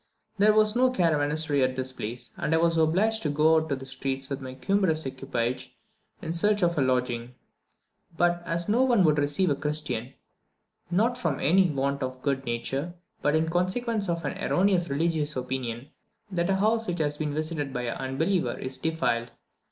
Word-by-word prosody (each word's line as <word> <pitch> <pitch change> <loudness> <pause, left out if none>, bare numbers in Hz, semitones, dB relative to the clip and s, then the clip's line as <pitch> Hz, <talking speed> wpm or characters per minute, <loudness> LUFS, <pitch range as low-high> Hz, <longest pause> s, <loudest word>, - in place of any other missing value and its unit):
There 210 +1 +6
was 215 0 +4
no 255 +1 +4
caravansary 155 - +1
at 130 0 0
this 130 0 -3
place, 120 -1 -6
and 160 - 0
I - - +4
was 165 0 +2
obliged 185 +8 +2
to 150 - -1
go 150 +2 +4
about 155 -3 0
the 135 - -9
streets 135 0 -4
with 140 0 -3
my 130 0 -7
cumbrous 185 -2 +1
equipage 130 -2 -3 0.5
in 160 - -2
search 205 +3 +2
of 170 0 +2
a 145 - +1
lodging; 125 -2 0 0.8
but 175 0 +2
as 170 0 -2
no 225 +4 +3
one 240 -7 +4
would 150 -3 +4
receive 145 +4 +1
a - - +2
Christian, 150 -4 -3 0.8
not 225 +8 +1
from 155 - -1
any 180 +4 +4
want 140 -1 -1
of 130 0 -4
good 135 -1 -1
nature, 135 +8 -3 0.3
but 145 +1 +2
in 160 +1 +2
consequence 200 +5 -1
of 170 -1 -2
an - - -3
erroneous 185 -3 +2
religious 150 +1 0
opinion 125 0 -4 0.4
that 175 -1 0
a 195 - +3
house 220 +3 +1
which 175 - -2
has 150 -2 -1
been 150 -1 -2
visited 155 -2 -2
by 125 -2 -3
an 120 -1 -3
unbeliever 135 +1 -1
is 130 0 -5
defiled. 120 -8 0
155 Hz, 185 wpm, -27 LUFS, 135-175 Hz, 0.8 s, There